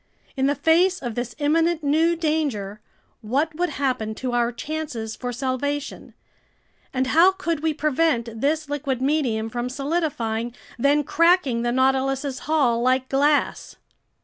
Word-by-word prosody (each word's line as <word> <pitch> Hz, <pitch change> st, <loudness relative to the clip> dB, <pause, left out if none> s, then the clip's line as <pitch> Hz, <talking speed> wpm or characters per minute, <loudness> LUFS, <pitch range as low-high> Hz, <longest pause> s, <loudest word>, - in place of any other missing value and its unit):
In 265 Hz, -1 st, +1 dB
the 285 Hz, -, +1 dB
face 355 Hz, +5 st, +3 dB
of 240 Hz, -3 st, -4 dB
this 245 Hz, +1 st, -4 dB
imminent 325 Hz, +2 st, +1 dB
new 320 Hz, +4 st, +2 dB
danger, 285 Hz, -, -2 dB, 0.4 s
what 280 Hz, +8 st, 0 dB
would 355 Hz, +3 st, -1 dB
happen 255 Hz, -7 st, -2 dB
to 255 Hz, +2 st, -3 dB
our 240 Hz, 0 st, +1 dB
chances 245 Hz, -5 st, -5 dB
for 250 Hz, -1 st, -4 dB
salvation, 275 Hz, +3 st, -3 dB, 0.8 s
and 260 Hz, 0 st, 0 dB
how 335 Hz, +8 st, +5 dB
could 335 Hz, -5 st, -2 dB
we 320 Hz, +1 st, 0 dB
prevent 280 Hz, -7 st, 0 dB
this 305 Hz, +2 st, 0 dB
liquid 280 Hz, -3 st, -2 dB
medium 260 Hz, -6 st, 0 dB
from 240 Hz, +2 st, -3 dB
solidifying, 255 Hz, -6 st, -2 dB, 0.2 s
then 285 Hz, +4 st, +3 dB
cracking 335 Hz, -7 st, +3 dB
the 240 Hz, 0 st, 0 dB
Nautilus's 265 Hz, +1 st, +1 dB
hull 255 Hz, -7 st, +2 dB
like 255 Hz, +1 st, +1 dB
glass? 290 Hz, +2 st, +1 dB
275 Hz, 140 wpm, -23 LUFS, 245-310 Hz, 0.8 s, how